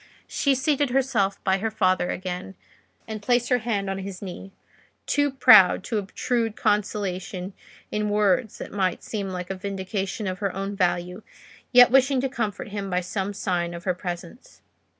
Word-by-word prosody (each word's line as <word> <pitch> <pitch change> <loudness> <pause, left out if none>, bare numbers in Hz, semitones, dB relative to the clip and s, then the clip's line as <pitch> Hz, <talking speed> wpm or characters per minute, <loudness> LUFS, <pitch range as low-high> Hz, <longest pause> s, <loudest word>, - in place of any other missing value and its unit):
She 280 -2 +1
seated 285 +1 +1
herself 245 -7 +1
by 190 0 +2
her 225 +3 -1
father 185 -4 +1
again, 185 +1 -5 0.5
and 215 -1 -5
placed 240 +2 +1
her 250 - +3
hand 215 -4 -2
on 195 0 -3
his 190 -1 -6
knee—too 195 +9 -4
proud 190 -8 +7
to 220 -1 -1
obtrude 225 +3 -2
consolation 195 -3 -1 0.4
in 210 0 -1
words 205 +1 +1
that - - -8
might 190 -3 -1
seem 200 -3 -4
like 180 0 -5
a - - -2
vindication 195 +1 -4
of 185 -1 -3
her 195 -3 -2
own 195 +1 -3
value, 180 +1 -1 0.5
yet 245 -1 +8
wishing 270 0 +4
to 270 - -1
comfort 215 -5 -3
him 200 -1 -4
by 180 0 0
some 190 +2 -3
sign 175 -3 -2
of 170 - -8
her 185 - +1
presence. 175 +4 -8
200 Hz, 165 wpm, -25 LUFS, 185-225 Hz, 0.5 s, yet